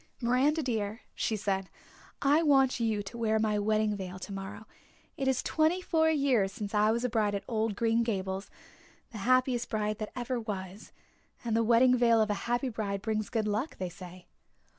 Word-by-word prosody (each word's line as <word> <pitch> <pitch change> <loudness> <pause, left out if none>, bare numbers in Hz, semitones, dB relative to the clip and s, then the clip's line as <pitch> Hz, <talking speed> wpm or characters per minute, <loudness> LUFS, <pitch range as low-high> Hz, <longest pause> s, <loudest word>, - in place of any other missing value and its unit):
"Miranda 270 +6 +2
dear," 220 -3 -2
she 220 - -1
said, 195 -2 -2 0.5
"I 290 +3 +4
want 270 -5 +3
you 220 -3 0
to 200 +4 -8
wear 220 -1 +2
my 215 -1 +1
wedding 215 0 +1
veil 185 -2 -6
tomorrow. 195 +2 -7 0.5
It 270 - -2
is 265 -2 +1
twenty 320 +3 +2
four 320 -3 +2
years 270 -10 +2
since 210 -2 -6
I 210 0 +3
was 235 +2 0
a - - +2
bride 215 -3 +1
at 200 - -3
old 220 -3 -1
Green 230 +1 +2
Gables 195 -3 -2 0.6
the 220 - -7
happiest 255 +2 +2
bride 215 -1 -1
that 215 - -5
ever 250 0 -2
was 200 -3 -6 0.5
and 225 -2 0
the 230 - +3
wedding 240 +3 +5
veil 235 -2 +4
of 215 -1 +2
a 210 - -4
happy 240 +2 +1
bride 205 -4 -3
brings 215 -2 -1
good 220 -3 -1
luck, 215 +9 -2
they 185 -1 -3
say." 180 0 -11
220 Hz, 185 wpm, -30 LUFS, 205-250 Hz, 0.6 s, wedding